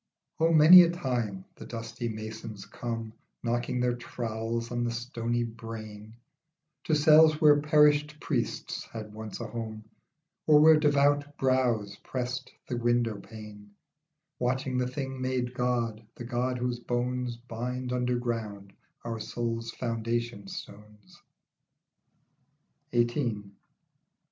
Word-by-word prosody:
O 165 +1 +4
many 165 +3 +10
a 170 - +4
time 120 - -2
the - - -11
dusty 115 +1 -5
masons 110 -1 -7
come 115 +1 -5 0.3
Knocking 120 +1 -1
their 125 0 +2
trowels 115 -1 -4
in 120 0 -1
the 120 - 0
stony 120 0 -2
brain 110 -2 -8 0.7
To 160 - +2
cells 155 +1 +6
where 150 -2 +6
perished 150 0 +4
priests - - -2
had 110 -2 -8
once 110 -2 -7
a - - -4
home, 110 -2 -6 0.6
Or 150 -1 +7
where 155 0 +7
devout 145 0 +2
brows 120 -6 +1
pressed 125 +2 -4 0.2
the 125 - -2
window 120 -3 +1
pane, 105 -2 -12 0.6
Watching 130 +1 0
the 125 - 0
thing 135 0 -5
made 130 -1 -1
God, 120 -3 -1
the 120 - -8
God 125 +1 -1
whose 125 0 -2
bones 120 0 -2
Bind 125 +2 -4
underground 115 -5 -2 0.3
our 115 -1 -3
soul's 115 0 -3
foundation 115 -3 -3
stones. 105 -1 -11 1.7
21 120 -2 +3
XVIII. 115 -6 -3
120 Hz, 120 wpm, -29 LUFS, 110-130 Hz, 1.7 s, many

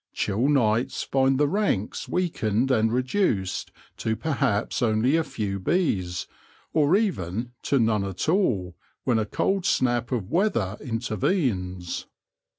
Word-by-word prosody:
Chill 110 +7 0
nights 120 -4 +2
find 135 0 +2
the 145 - +4
ranks 170 - -1
weakened 135 - 0
and 110 -2 +3
reduced 125 - 0 0.3
to 110 0 -1
perhaps 110 -8 0
only 120 +4 +2
a 165 - +2
few 100 -8 -3
bees, 95 - 0 0.5
or 155 +2 +4
even 120 - -1
to 140 - +1
none 110 -4 +2
at 95 - -4
all 115 - +1 0.3
when 120 -3 +2
a 110 - -1
cold 195 - 0
snap 120 -7 +1
of 115 -4 -2
weather 165 - +1
intervenes. 110 - -1
120 Hz, 130 wpm, -25 LUFS, 100-150 Hz, 0.5 s, the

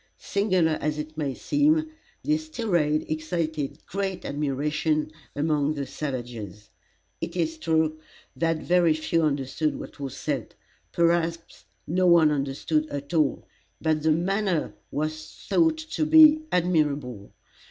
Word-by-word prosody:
Singular 185 -6 +1
as 150 0 -1
it 155 +1 -6
may 145 -4 -2
seem, 310 +2 +2 0.3
this 310 +1 0
tirade 170 - 0
excited 155 -2 -3
great 190 -1 -3
admiration 150 +2 -1 0.2
among 150 0 +1
the 140 -1 -3
savages. 120 -9 -6 0.5
It 170 - -4
is 160 -2 -1
true, 160 -1 +1 0.4
that 165 -1 +1
very 175 -3 +3
few 160 +1 0
understood 145 0 -1
what - - -10
was 135 -2 -5
said; 140 -7 -3 0.4
perhaps 170 -1 0 0.2
no 180 +4 +1
one 170 -3 +6
understood 150 +2 -1 0.2
all, 155 -5 +1 0.3
but 155 -1 +1
the 160 +1 +3
manner 185 +1 0 0.2
was 155 +1 -5
thought 325 -2 +3
to 315 -1 -2
be 310 -1 +8
admirable. 150 - 0
155 Hz, 120 wpm, -26 LUFS, 150-175 Hz, 0.5 s, be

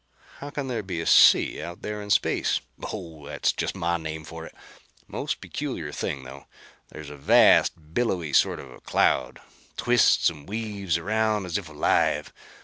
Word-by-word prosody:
"How 145 - -7
can 145 -2 -4
there 120 -4 -2
be 95 -4 -5
a 80 - -4
sea - - +5
out 85 0 -8
there 105 0 -4
in 105 - -9
space?" - - +2 0.3
"Oh, 80 -4 -8
that's - - 0
just - - -3
my 85 +1 0
name 80 -1 -6
for 80 0 -9
it. - - -16 0.5
Most - - -4
peculiar 130 - -5
thing, 70 -2 -4
though. 65 +2 -11 0.4
There's 75 -2 -10
a 75 - -10
vast, 75 +2 +4
billowy 90 - -1
sort - - +3
of 65 - -11
a - - -14
cloud. - - +1 0.4
Twists 120 0 +4
and 75 +1 -13
weaves 100 -5 -2
around 110 +2 0
as 90 +1 -2
if 90 -6 -11
alive. 75 0 +1
85 Hz, 170 wpm, -25 LUFS, 75-105 Hz, 0.5 s, sea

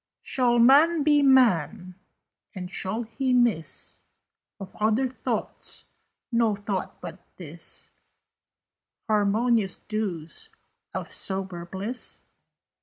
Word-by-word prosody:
"Shall 245 -2 +2
Man 290 +7 +6
be 295 -1 +5
Man? 220 - +3 0.6
And 180 -1 -6
shall 195 +6 -3
he 255 +3 -1
miss 235 -10 0 0.6
Of 195 -1 -8
other 220 +5 +2
thoughts 255 - -4 0.5
no 230 -3 +2
thought 200 -1 -4
but - - -8 0.2
this, - - -5 1.1
Harmonious 215 -1 +2
dews 190 -7 -4 0.5
of - - -4
sober 190 -3 -3
bliss? 200 +8 -6
220 Hz, 95 wpm, -26 LUFS, 190-250 Hz, 1.1 s, Man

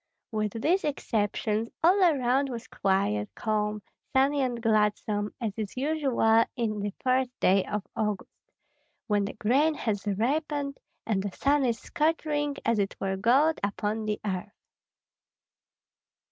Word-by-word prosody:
With 215 0 -2
these 365 +5 +3
exceptions 220 -4 -1
all 365 +5 +5
around 275 -4 +3
was 240 -1 -6
quiet, 105 - 0
calm, 210 -1 -1 0.3
sunny, 275 +2 +3
and 245 -3 -1
gladsome, 210 -2 +1
as 225 -5 -2
is 215 +2 -5
usual 260 -6 +3
in 220 -3 -1
the 205 0 -2
first 255 0 +2
days 190 +1 +3
of 205 -1 -2
August, 210 -3 -2 0.7
when 205 -2 +1
the - - -5
grain 280 +9 +2
has 210 -6 -2
ripened, 280 +6 -1 0.3
and 205 -4 0
the 200 -1 -5
sun 280 0 +3
is 235 -2 +1
scattering 300 -2 -1
as 230 -2 +2
it 195 -1 -1
were 190 0 -1
gold 265 +11 +3
upon 210 +2 -2
the 210 -1 -1
earth. 200 +1 -3
225 Hz, 135 wpm, -28 LUFS, 205-275 Hz, 0.7 s, all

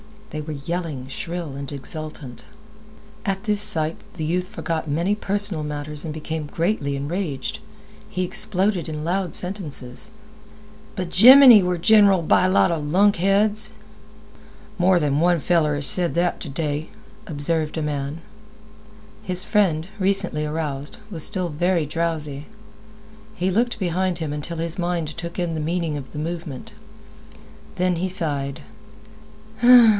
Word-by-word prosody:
They 155 - -4
were 155 +1 -6
yelling, 145 -3 -5
shrill 170 -2 -5
and 140 -1 -6
exultant. 145 -2 -7 0.8
At 195 0 -2
this 210 -2 +3
sight 160 -5 +5 0.2
the 160 - -5
youth 180 +4 -1
forgot 165 -6 -4
many 170 +7 0
personal 205 -4 +2
matters 150 0 -4
and 155 - -5
became 155 0 -5
greatly 165 -3 -1
enraged. 145 -1 -4 0.5
He 185 -3 -2
exploded 190 -1 +1
in 150 -1 -5
loud 180 +1 -2
sentences. 180 -5 -5 0.9
"B'jiminey, 225 +6 +8
we're 180 -1 -1
generaled 195 -2 +4
by 180 - +4
a - - +2
lot 185 - +3
'a 165 - 0
lunkheads." 195 +6 +2 1.1
"More 180 0 +4
than 145 -1 +1
one 175 +1 +3
feller 155 -2 +1
has 145 0 -2
said 175 +3 +2
that 175 +1 0
t' - - -7
day," 150 +2 -3 0.4
observed 155 +1 -2
a - - -1
man. 145 +1 -4 1.0
His 185 -3 -1
friend, 180 -6 +1
recently 190 -6 0
aroused, 150 -2 -4
was 165 -5 +5
still 185 -2 +4
very 170 +1 0
drowsy. 155 -2 -3 0.9
He 185 -1 -1
looked 235 +5 0
behind 180 -1 -1
him 160 -3 -3
until 150 +3 -5
his 165 +2 -4
mind 175 -3 -2
took 170 +2 -7
in 175 -2 -2
the 160 - -3
meaning 165 -1 -2
of 135 -2 -9
the 150 - -5
movement. 160 -4 -6 1.0
Then 180 -1 0
he 185 +3 -1
sighed. 145 -7 -2
170 Hz, 140 wpm, -22 LUFS, 150-185 Hz, 1.1 s, B'jiminey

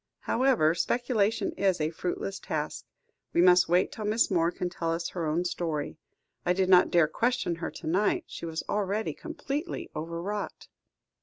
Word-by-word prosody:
However, 240 -11 +3
speculation 225 +4 +1
is 190 -3 +1
a 155 +1 0
fruitless 180 +3 -3
task; - - -4 0.5
we - - +4
must 180 -1 +6
wait 180 +2 +3
till 215 - -6
Miss 215 +1 +2
Moore 170 -2 +3
can 180 +1 -3
tell 170 -2 -2
us 170 +1 -2
her 170 -3 -3
own 165 +4 0
story. 155 -4 -3 0.4
I 180 - +2
did 185 0 +1
not 180 -1 +6
dare 170 -3 +4
question 230 -1 0
her 165 - -3
to - - -10
night, 210 - +1
she 170 - -7
was 160 0 -3
already 205 +1 -1
completely 320 0 -5
overwrought." 170 +6 -4
180 Hz, 165 wpm, -28 LUFS, 170-210 Hz, 0.5 s, must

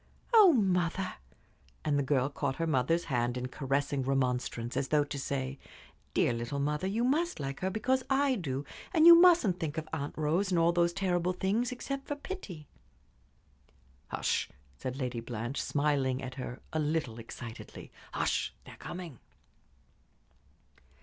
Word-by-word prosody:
"Oh, 425 -5 +9
mother!" 185 - +1 0.7
And 145 -2 +2
the - - +3
girl 135 -1 +2
caught 140 -1 -2
her 165 - -1
mother's 160 +3 +1
hand 120 -3 -1
in 125 0 -3
caressing 140 +1 -1
remonstrance, 125 -3 -1
as 135 - 0
though 150 0 +3
to 145 -1 -5
say: 135 0 -3 0.6
"Dear 120 - +3
little 120 +4 -3
mother, 150 +5 -1
you 220 +5 0
must 305 - +1
like 135 -1 -4
her, 190 - 0
because 255 +6 0
I 275 0 +3
do; 145 - -3 0.3
and 320 -1 +6
you 340 - +12
mustn't 330 - +5
think 160 -1 -3
of 160 0 -3
Aunt 145 -2 -4
Rose, 160 +6 +1
and 180 - +2
all 165 0 +4
those 170 0 +2
terrible 180 0 0
things, 210 +7 0
except 275 +2 -5
for 290 - -2
pity." 215 - -8 1.4
"Hush!" - - -1 0.3
said 125 - -5
Lady 125 -3 -2
Blanche, 120 +2 -4
smiling 140 -3 +1
at 130 0 -5
her 130 -1 -6
a 160 - 0
little 150 -6 -1
excitedly. 115 0 -9 0.2
"Hush; - - 0
they're - - -12
coming!" 175 -8 -8
150 Hz, 155 wpm, -31 LUFS, 130-190 Hz, 1.4 s, you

